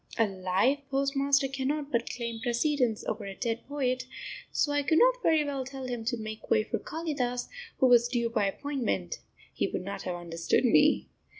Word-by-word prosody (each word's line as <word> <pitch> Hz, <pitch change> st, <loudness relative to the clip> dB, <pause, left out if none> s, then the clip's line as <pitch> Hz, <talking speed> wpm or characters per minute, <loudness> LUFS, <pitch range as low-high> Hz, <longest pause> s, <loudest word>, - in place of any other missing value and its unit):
A 225 Hz, -, +4 dB
live 195 Hz, +7 st, +1 dB
postmaster 275 Hz, 0 st, +2 dB
cannot 275 Hz, +2 st, -2 dB
but 235 Hz, -2 st, 0 dB
claim 235 Hz, -2 st, -4 dB
precedence 245 Hz, -1 st, +1 dB
over 215 Hz, -, -3 dB
a 195 Hz, -1 st, -6 dB
dead 230 Hz, 0 st, -2 dB
poet, 260 Hz, -3 st, -1 dB, 0.4 s
so 290 Hz, -, +1 dB
I 290 Hz, 0 st, +2 dB
could 285 Hz, +3 st, +2 dB
not -, -, +5 dB
very 320 Hz, -6 st, +4 dB
well 275 Hz, -2 st, -2 dB
tell 265 Hz, 0 st, -7 dB
him 245 Hz, -2 st, -4 dB
to 240 Hz, +1 st, 0 dB
make 220 Hz, 0 st, -7 dB
way 215 Hz, -, +4 dB
for -, -, -3 dB
Kalidas, 285 Hz, -7 st, -3 dB, 0.3 s
who -, -, +4 dB
was 240 Hz, -1 st, +6 dB
due 235 Hz, -2 st, -1 dB
by 215 Hz, -4 st, +2 dB
appointment, 225 Hz, -, -2 dB, 0.3 s
he -, -, 0 dB
would -, -, -4 dB
not 200 Hz, +2 st, -5 dB
have 180 Hz, -, -3 dB
understood 170 Hz, +5 st, 0 dB
me! 245 Hz, -, +4 dB
250 Hz, 185 wpm, -29 LUFS, 225-280 Hz, 0.4 s, was